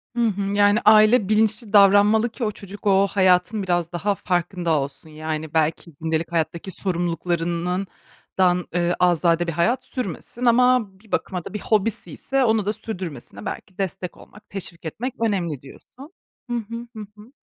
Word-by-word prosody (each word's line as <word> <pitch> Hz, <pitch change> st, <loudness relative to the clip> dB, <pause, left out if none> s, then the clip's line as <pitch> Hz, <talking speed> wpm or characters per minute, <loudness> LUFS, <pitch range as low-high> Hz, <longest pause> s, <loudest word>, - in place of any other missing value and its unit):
Hı 235 Hz, -1 st, +2 dB
hı. 200 Hz, -2 st, -2 dB
Yani, 205 Hz, +1 st, +4 dB
aile 215 Hz, 0 st, +6 dB
bilinçli 215 Hz, 0 st, +1 dB
davranmalı 205 Hz, +3 st, +6 dB
ki 235 Hz, +1 st, -7 dB
o 215 Hz, -, 0 dB
çocuk 205 Hz, 0 st, -9 dB
o 195 Hz, 0 st, +4 dB
hayatın 190 Hz, +2 st, +2 dB
biraz 175 Hz, -2 st, 0 dB
daha 195 Hz, +4 st, -1 dB
farkında 175 Hz, -2 st, -1 dB
olsun. 140 Hz, +2 st, -6 dB
Yani, 155 Hz, 0 st, -5 dB
belki 160 Hz, +1 st, 0 dB
gündelik 160 Hz, +1 st, -1 dB
hayattaki 170 Hz, +3 st, -2 dB
sorumluluklarından 175 Hz, 0 st, -2 dB, 0.5 s
dan 180 Hz, -1 st, +2 dB
eee, 175 Hz, 0 st, +1 dB
azade 175 Hz, -1 st, +3 dB
bir -, -, 0 dB
hayat 230 Hz, +11 st, +1 dB
sürmesin 245 Hz, -, -5 dB
ama 250 Hz, -1 st, +4 dB
bir 215 Hz, -1 st, -22 dB
bakıma 180 Hz, -3 st, -2 dB
da -, -, -8 dB
bir 210 Hz, -, -3 dB
hobisiyse 225 Hz, +5 st, 0 dB
onu 220 Hz, -3 st, +2 dB
da 210 Hz, -, 0 dB
sürdürmesine 175 Hz, -, -7 dB
belki 185 Hz, -, -7 dB
destek 185 Hz, -2 st, -4 dB
olmak, 210 Hz, -, -17 dB
teşvik 175 Hz, -3 st, -6 dB
etmek 235 Hz, -, -4 dB
önemli, 175 Hz, -, -1 dB
diyorsun. 270 Hz, -, -14 dB, 0.4 s
Hı -, -, -2 dB
hı, 230 Hz, +1 st, -6 dB
hı 220 Hz, -, -7 dB
hı. 210 Hz, +3 st, -12 dB
195 Hz, 160 wpm, -23 LUFS, 170-215 Hz, 0.5 s, aile